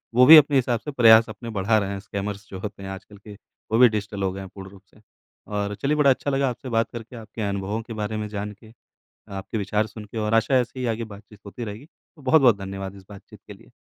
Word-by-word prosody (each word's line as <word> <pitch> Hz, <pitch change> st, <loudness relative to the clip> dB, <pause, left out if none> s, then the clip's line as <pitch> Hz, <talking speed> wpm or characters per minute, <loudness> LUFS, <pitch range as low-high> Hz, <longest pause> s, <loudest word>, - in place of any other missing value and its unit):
वो 125 Hz, +1 st, +7 dB
भी 155 Hz, +4 st, +11 dB
अपने 145 Hz, -1 st, +5 dB
हिसाब 120 Hz, -2 st, +1 dB
से 150 Hz, -, -7 dB
प्रयास 115 Hz, -4 st, +7 dB
अपने 115 Hz, +2 st, -8 dB
बढ़ा 110 Hz, +3 st, +3 dB
रहे 100 Hz, -2 st, -1 dB
हैं, 100 Hz, -1 st, -4 dB
स्कैमर्स 100 Hz, 0 st, -6 dB
जो 95 Hz, -, -7 dB
होते 100 Hz, -1 st, -7 dB
हैं 95 Hz, -, -6 dB
आजकल 95 Hz, +2 st, -10 dB
के। 105 Hz, +1 st, -12 dB, 0.4 s
वो 110 Hz, -, +3 dB
भी 125 Hz, 0 st, +7 dB
डिजिटल 105 Hz, -2 st, -4 dB
हो 95 Hz, -, 0 dB
गए 95 Hz, -, -7 dB
हैं 95 Hz, -, -9 dB
पूर्ण 95 Hz, -1 st, -9 dB
रूप 100 Hz, -1 st, -16 dB
से। 105 Hz, -, -21 dB, 0.5 s
और 105 Hz, 0 st, -3 dB
चलिए, 145 Hz, +2 st, +1 dB
बड़ा 145 Hz, -2 st, +4 dB
अच्छा 140 Hz, +2 st, +1 dB
लगा 135 Hz, -1 st, +1 dB
आपसे 125 Hz, +2 st, -7 dB
बात 115 Hz, 0 st, +1 dB
करके, 120 Hz, +1 st, -8 dB
आपके 110 Hz, -1 st, -9 dB
अनुभवों 100 Hz, +3 st, -3 dB
के 115 Hz, 0 st, -9 dB
बारे 110 Hz, 0 st, -3 dB
में 105 Hz, 0 st, -3 dB
जानके, 105 Hz, +1 st, -7 dB, 0.6 s
आपके 95 Hz, +3 st, -5 dB
विचार 105 Hz, +2 st, 0 dB
सुन 105 Hz, +1 st, -10 dB
के 105 Hz, -, -9 dB
और 105 Hz, 0 st, -1 dB
आशा 115 Hz, +4 st, +2 dB
है, 125 Hz, -, +5 dB
ऐसे 125 Hz, +2 st, -7 dB
ही 125 Hz, -, -2 dB
आगे 115 Hz, -, -5 dB
बातचीत 105 Hz, 0 st, -15 dB
होती 110 Hz, +4 st, -7 dB
रहेगी। 110 Hz, +5 st, -7 dB
तो 155 Hz, -1 st, -25 dB
बहुत-बहुत 130 Hz, -5 st, +5 dB
धन्यवाद 95 Hz, 0 st, -6 dB
इस 95 Hz, -, -14 dB
बातचीत 100 Hz, -1 st, -13 dB
के -, -, -9 dB
लिए। -, -, -19 dB
110 Hz, 255 wpm, -24 LUFS, 100-120 Hz, 0.6 s, भी